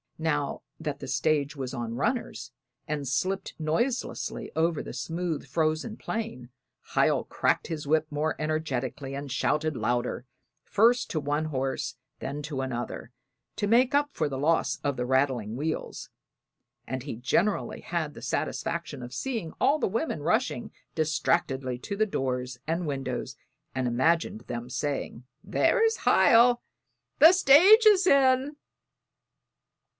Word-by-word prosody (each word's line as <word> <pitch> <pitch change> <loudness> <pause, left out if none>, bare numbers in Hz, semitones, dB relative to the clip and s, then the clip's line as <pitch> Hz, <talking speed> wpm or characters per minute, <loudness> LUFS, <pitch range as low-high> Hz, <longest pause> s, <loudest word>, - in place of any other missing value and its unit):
Now 150 -3 -1 0.2
that 150 -3 -4
the - - -7
stage 145 +2 0
was 130 -2 -5
on 115 -2 -4
runners, 235 - -2 0.4
and 145 -2 -3
slipped 185 +9 -1
noiselessly 200 - -2
over 165 0 +1
the - - -8
smooth 160 +3 -3
frozen 155 - -1
plain, 220 - -5 0.4
Hiel - - +3
cracked - - 0
his 155 -3 -5
whip 155 +1 +2
more 150 +2 -1
energetically 140 -3 -2
and 140 -1 -6
shouted 150 +3 0
louder, 120 0 -1 0.4
first 235 +4 +3
to 155 - 0
one 145 +1 -1
horse 135 -4 -3 0.2
then 140 +2 -4
to 145 -3 -3
another, 120 -2 -5 0.4
to 205 - -1
make 250 +5 +4
up 290 0 +3
for 155 -2 -1
the 135 - -4
loss 160 +4 +1
of 140 -1 0
the 125 -1 -2
rattling 130 -4 +1
wheels; 155 +5 -4 0.8
and 130 -1 -4
he 140 - -5
generally 170 - 0
had 160 -3 -3
the - - -11
satisfaction 165 -5 -3
of 125 +1 -8
seeing 225 - -3
all 295 +2 +3
the - - +1
women 215 - -2
rushing 220 - 0 0.2
distractedly 135 -4 0
to 200 - -5
doors 125 -8 -3
and 165 +1 -1
windows, 135 -2 -4 0.4
and 130 -1 -1
imagined 130 0 +1
them 120 0 -6
saying, 130 -2 -3 0.2
"There's 455 -2 +2
Hiel; 240 +1 +5 0.6
the 325 +4 +9
stage 375 - +7
is 395 -3 +6
in!" 270 -1 +4
155 Hz, 135 wpm, -27 LUFS, 130-200 Hz, 0.8 s, the